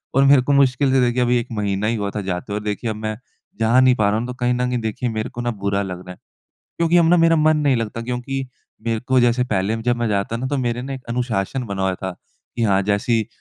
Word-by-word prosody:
और 135 Hz, -, +5 dB
मेरे 140 Hz, -1 st, +6 dB
को 140 Hz, +3 st, 0 dB
मुश्किल 135 Hz, 0 st, +3 dB
से 130 Hz, -1 st, +4 dB
देखिए 125 Hz, 0 st, +1 dB
अभी 125 Hz, 0 st, +3 dB
1 120 Hz, -, -5 dB
महीना 105 Hz, 0 st, -1 dB
ही 115 Hz, -, +1 dB
हुआ 100 Hz, -2 st, -2 dB
था 105 Hz, -, -1 dB
जाते 95 Hz, +1 st, -4 dB
हुए 105 Hz, -, -1 dB
और -, -, -11 dB
देखिए 105 Hz, +2 st, -3 dB
अब 110 Hz, -, -3 dB
मैं 110 Hz, 0 st, -4 dB, 0.4 s
जा 115 Hz, +3 st, +4 dB
नहीं 130 Hz, -1 st, +5 dB
पा 105 Hz, -4 st, +2 dB
रहा 105 Hz, -, +1 dB
हूँ 120 Hz, -, -4 dB
तो 125 Hz, -, -5 dB
कहीं 125 Hz, 0 st, +1 dB
न 125 Hz, 0 st, 0 dB
कहीं 125 Hz, -1 st, -1 dB
देखिए 110 Hz, +2 st, -2 dB
मेरे 110 Hz, -1 st, -3 dB
को 120 Hz, -, -6 dB
ना 120 Hz, 0 st, -1 dB
बुरा 100 Hz, -2 st, -1 dB
लग 90 Hz, -2 st, -5 dB
रहा -, -, -6 dB
है। -, -, -18 dB, 0.6 s
क्योंकि 170 Hz, +1 st, +3 dB
अब 165 Hz, -1 st, +4 dB
ना 175 Hz, -, +5 dB
मेरा 165 Hz, -1 st, +4 dB
मन 155 Hz, 0 st, +4 dB
नहीं 145 Hz, -3 st, +2 dB
लगता 115 Hz, 0 st, -3 dB
क्योंकि 125 Hz, +3 st, -3 dB, 0.4 s
मेरे 115 Hz, -1 st, 0 dB
को 130 Hz, +2 st, +2 dB
जैसे 120 Hz, +1 st, +2 dB
पहले 105 Hz, -2 st, 0 dB
अ, -, -, -2 dB
जब 120 Hz, +1 st, 0 dB
मैं 120 Hz, -1 st, -1 dB
जाता 100 Hz, +2 st, -1 dB
ना 130 Hz, +3 st, -3 dB
तो 140 Hz, +1 st, -1 dB
मेरे 120 Hz, -1 st, -1 dB
ना 135 Hz, +2 st, -5 dB
एक 130 Hz, -1 st, -7 dB
अनुशासन 120 Hz, 0 st, -2 dB
बना 100 Hz, -2 st, -3 dB
हुआ 95 Hz, -1 st, +1 dB
था 95 Hz, +1 st, -5 dB, 0.5 s
कि 115 Hz, -, -1 dB
हाँ, 100 Hz, -3 st, +3 dB
जैसे 100 Hz, +4 st, 0 dB
ही 110 Hz, -2 st, +2 dB
120 Hz, 285 wpm, -21 LUFS, 105-130 Hz, 0.6 s, मेरे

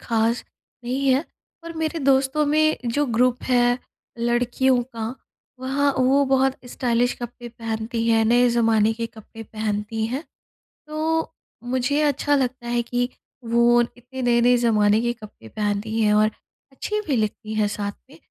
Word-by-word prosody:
ख़ास 230 Hz, +1 st, 0 dB, 0.4 s
नहीं 265 Hz, +3 st, -1 dB
है। 265 Hz, +5 st, +3 dB, 0.4 s
पर 335 Hz, 0 st, -7 dB
मेरे 320 Hz, +1 st, -2 dB
दोस्तों 270 Hz, +1 st, +2 dB
में 310 Hz, +1 st, +3 dB
जो 285 Hz, +5 st, +1 dB
ग्रुप 245 Hz, +1 st, +1 dB
है 245 Hz, -1 st, +3 dB, 0.4 s
लड़कियों 245 Hz, +2 st, +2 dB
का, 230 Hz, -1 st, -6 dB, 0.5 s
वह 280 Hz, +2 st, +1 dB
वो 265 Hz, +2 st, +3 dB
बहुत 265 Hz, 0 st, +2 dB, 0.2 s
स्टाइलिश 245 Hz, -1 st, +1 dB
कपड़े 240 Hz, 0 st, -7 dB
पहनती 225 Hz, 0 st, -3 dB
हैं, 225 Hz, -1 st, +4 dB
नए 240 Hz, +2 st, +4 dB
ज़माने 225 Hz, -2 st, +3 dB
के 230 Hz, +1 st, -3 dB
कपड़े 225 Hz, 0 st, -12 dB
पहनती 215 Hz, 0 st, -3 dB
हैं। 260 Hz, +6 st, -3 dB, 0.7 s
तो, 320 Hz, +1 st, -1 dB, 0.3 s
मुझे 260 Hz, +4 st, 0 dB
अच्छा 290 Hz, 0 st, +2 dB
लगता 255 Hz, -2 st, -1 dB
है 240 Hz, 0 st, +1 dB
कि 245 Hz, +1 st, -1 dB, 0.4 s
वो 235 Hz, +1 st, +4 dB
इतने 245 Hz, +2 st, -6 dB
नए-नए 245 Hz, 0 st, +4 dB
ज़माने 215 Hz, -2 st, +3 dB
के 240 Hz, 0 st, 0 dB
कपड़े 210 Hz, -, -13 dB
पहनती 210 Hz, +1 st, -2 dB
हैं 210 Hz, -1 st, +3 dB
और 215 Hz, +1 st, +4 dB, 0.4 s
अच्छी 420 Hz, +10 st, -3 dB
भी 280 Hz, -, +1 dB
लगती 215 Hz, 0 st, -2 dB
है 215 Hz, -1 st, +1 dB
साथ 205 Hz, 0 st, -3 dB, 0.2 s
में -, -, -15 dB
240 Hz, 150 wpm, -23 LUFS, 225-265 Hz, 0.7 s, हैं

